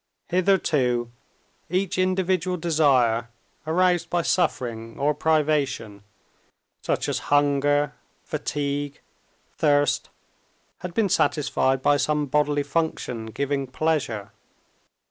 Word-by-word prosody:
Hitherto 150 -10 +1 0.6
each 185 +1 -1
individual 185 -1 +1
desire, 135 -9 +2 0.4
aroused 175 +1 +2
by 175 -1 0
suffering 115 -11 -1
or 145 +2 +1
privation, 145 -9 0 0.8
such - - -1
as - - -1
hunger, 145 0 +2 0.3
fatigue, 145 0 -3 0.6
thirst, 145 -1 +2 0.7
had 180 -1 -7
been 220 -3 +3
satisfied 135 -6 +1
by 145 - +4
some 150 0 0
bodily 145 +1 +1
function 140 -6 -2
giving 140 +4 -2
pleasure. 130 -7 -1
145 Hz, 90 wpm, -24 LUFS, 135-165 Hz, 0.8 s, by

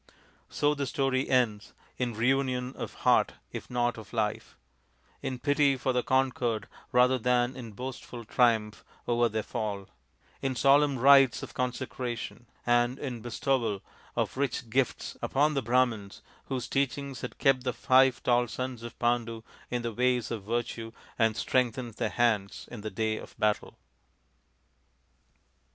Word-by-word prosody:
So 145 0 +2
the 140 -2 -2
story 135 0 0
ends 115 -5 +1 0.2
in 120 -3 -2
reunion 125 +1 +1
of - - -6
heart - - +4 0.2
if - - -7
not 120 -1 0
of 110 +1 -13
life; 110 -2 -2 0.6
in 135 -2 -3
pity 145 0 +2
for 130 +1 0
the 125 - +2
conquered 125 -5 0 0.2
rather 125 +1 +4
than 125 +1 +2
in 115 -5 -8
boastful 125 0 -7
triumph 110 -3 +2 0.2
over 120 0 +3
their 110 0 -2
fall; 100 -3 -4 0.5
in 135 -1 -1
solemn 140 +2 +4
rites 135 -1 +6
of - - -8
consecration; 125 -1 -4 0.2
and 120 +1 +3
in 125 -6 -5
bestowal 120 -3 -1 0.3
of - - -1
rich 130 -3 -2
gifts 130 0 0
upon 150 +3 +2
the 135 - 0
Brahmans 120 -4 0 0.2
whose 130 -3 -3
teachings 140 -1 -1
had - - -6
kept 130 -2 +3
the 125 - 0
five 130 0 +4
tall 120 0 +3
sons 125 0 -4
of 120 0 -8
Pandu 120 -1 0 0.3
in 120 -1 -2
the 115 -1 -3
ways 125 0 +1
of 115 -3 -3
virtue 115 +1 -3 0.3
and 110 -1 +3
strengthened 125 -1 0
their 115 -3 0
hands 110 -5 0
in - - -7
the 110 - -4
day 110 +1 -1
of - - -11
battle. 105 -1 0
125 Hz, 145 wpm, -29 LUFS, 115-130 Hz, 0.6 s, rites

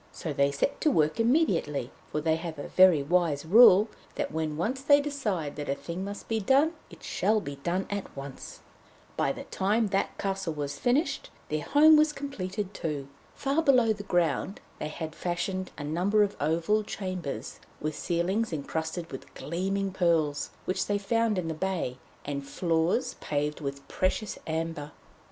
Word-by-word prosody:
So 160 - -5
they 140 0 +3
set 140 - -1
to 310 - +4
work 155 - +2
immediately, 195 - +2 0.2
for 150 - -1
they 160 +1 +2
have 165 -1 -6
a 145 - -6
very 185 -6 +6
wise 160 -2 +1
rule 210 +2 +8 0.3
that - - -2
when 155 -1 -2
once 240 +11 -1
they 285 +1 +6
decide 220 - -2
that 145 - -4
a 140 - +1
thing 175 +5 -5
must 200 +1 -6
be 225 -1 0
done, 270 +9 +4 0.2
it - - -14
shall 215 0 +1
be 140 -8 -6
done 175 +7 -1
at 200 -7 -5
once. 135 -1 -8 0.5
By - - +1
the - - -6
time 210 +3 0
that 195 0 +1
the - - -7
castle 190 -4 -2
was 145 -1 -4
finished, 280 +4 +1 0.2
their 155 0 -1
home 305 - +6
was 305 0 +4
completed 210 -8 -4
too. 145 -6 -4 0.3
Far 280 +3 +1
below 250 -7 +4
the 205 - -7
ground 175 -2 0 0.2
they 150 - -2
had 155 0 -6
fashioned 185 +2 -2
a 145 - -5
number 180 +8 +2
of 205 - -1
oval 165 +8 +2
chambers, 185 -8 -5 0.2
with 155 +1 -2
ceilings 180 +8 0
encrusted 160 +2 -3
with 135 - -8
gleaming 195 +4 -2
pearls 165 -5 +1 0.2
which 185 - -1
they 205 - +1
found 225 +1 +1
in 180 -3 -1
the 160 - -1
bay, 165 -7 -2 0.3
and 140 -1 -3
floors 170 - 0
paved 150 +1 -2
with 140 -1 -5
precious 190 +3 -1
amber. 160 -2 -3
180 Hz, 175 wpm, -28 LUFS, 155-210 Hz, 0.5 s, rule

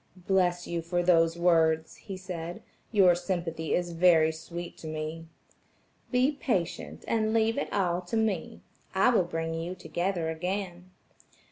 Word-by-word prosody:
"Bless 180 -1 +1
you 170 -1 -2
for 175 +1 -1
those 165 -1 +4
words," 160 -2 +3
he 195 -3 -8
said, 175 -2 -6 0.3
"your 190 -5 +6
sympathy 170 -3 -2
is 175 -1 -1
very 165 -2 +5
sweet 170 +2 -7
to 160 - -8
me." 155 +1 -5 0.8
"Be 255 +3 +3
patient, 175 - -3
and 220 -1 +1
leave 225 0 +3
it 280 - -3
all 180 -2 +1
to 225 - -1
me; 215 -6 -1 0.3
I 195 +6 +5
will 225 - +4
bring 165 -1 -3
you 165 +3 -4
together 170 0 -2
again." 180 +1 -4
175 Hz, 145 wpm, -29 LUFS, 165-190 Hz, 0.8 s, your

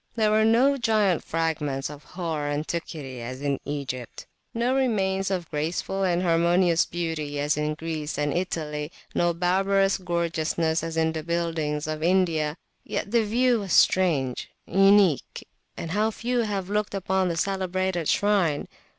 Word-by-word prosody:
There 215 -2 +2
were 215 0 +4
no 255 +5 +4
giant 215 - +2
fragments 150 -4 -1
of 150 0 -10
hoar 160 -1 -4
antiquity 145 -3 -4
as 125 +2 -6
in 140 -1 -1
Egypt, 135 -4 -5 0.3
no 235 +2 0
remains 195 -7 +1
of 180 -4 -2
graceful 165 +5 -2
and 180 -1 +1
harmonious 170 0 +3
beauty 160 -4 -3
as 145 +1 +1
in 150 0 -1
Greece 160 -2 -4
and 145 0 0
Italy, 155 -4 -3 0.2
no 175 0 +2
barbarous 195 +3 +2
gorgeousness 170 -2 -1
as 165 0 -4
in 160 0 +2
the 160 -1 -4
buildings 160 -2 -2
of 155 0 -4
India; 165 -3 +1 0.3
yet 200 - -4
the 235 -1 +3
view 240 +3 +2
was 195 -3 -3
strange, 145 -9 +3 0.2
uniqueand 195 -4 +1
how 210 +4 +2
few 240 +3 -2
have 205 -5 -1
looked 210 0 -1
upon 190 -1 0
the 170 - -2
celebrated 185 -2 -1
shrine! 195 -8 +2
170 Hz, 145 wpm, -25 LUFS, 155-195 Hz, 0.3 s, were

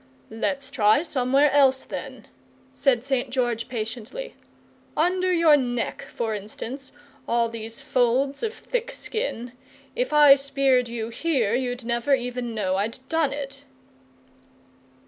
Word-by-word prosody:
"Let's 270 +4 -2
try 220 +2 +4
somewhere 275 -1 +2
else, 270 -2 +4
then," - - -7 0.5
said 245 -4 +2
St. 265 -1 -1
George, 240 -2 -1
patiently. 235 - -5 0.6
"Under 365 +3 +2
your 335 -4 +6
neck, 245 -4 -2
for 225 -2 -2
instance, 225 +6 -7 0.4
all 235 0 +2
these 230 +2 -7
folds 270 +1 +1
of 450 - -1
thick 475 +1 -4
skin, 440 - -4 0.4
if - - -1
I 295 -2 +8
speared 275 -3 +1
you 230 -1 -4
here 235 -4 0
you'd 245 -1 -2
never 235 +4 +2
even 245 -2 -4
know 190 -3 0
I'd 215 +4 -2
done 320 -4 +1
it!" 275 -1 -6
260 Hz, 125 wpm, -24 LUFS, 235-285 Hz, 0.6 s, I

